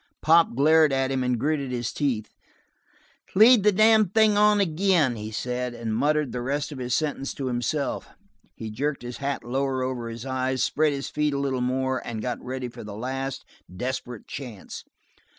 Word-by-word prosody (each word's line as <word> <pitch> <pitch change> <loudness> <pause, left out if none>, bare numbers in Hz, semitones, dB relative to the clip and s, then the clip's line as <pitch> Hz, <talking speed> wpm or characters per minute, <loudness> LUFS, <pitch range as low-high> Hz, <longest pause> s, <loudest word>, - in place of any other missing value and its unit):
Pop 165 -4 +5
glared 155 +2 +5
at 135 0 0
him 135 -1 0
and 125 -2 0
gritted 140 0 -1
his 120 -2 -3
teeth. 125 -8 -2 1.0
"Lead 225 +3 +7
the 210 +1 +4
damn 215 0 +5
thing 215 +1 +4
on 210 0 +4
ag'in," 170 -7 +2
he 105 0 -6
said, 125 +2 -3
and 115 -2 -3
muttered 150 +2 +1
the 125 - -4
rest 145 +4 -2
of 140 - -7
his 125 -1 -1
sentence 145 -3 -2
to 135 - -4
himself. 130 +4 -2 0.5
He 110 -1 -6
jerked 140 +4 -2
his 120 0 -6
hat 140 -3 -3
lower 130 +2 -1
over 125 -2 -3
his 115 +2 -7
eyes, 130 -1 -1
spread 155 0 +2
his 140 0 -4
feet 150 -1 0
a - - -1
little 135 -2 -1
more, 130 +1 0
and 115 -2 -5
got 120 +3 -4
ready 130 0 -4
for 120 - -10
the 105 -1 -8
last 135 +3 -4 0.3
desperate 125 +3 -5
chance. 120 -8 -8
130 Hz, 185 wpm, -25 LUFS, 125-150 Hz, 1.0 s, Lead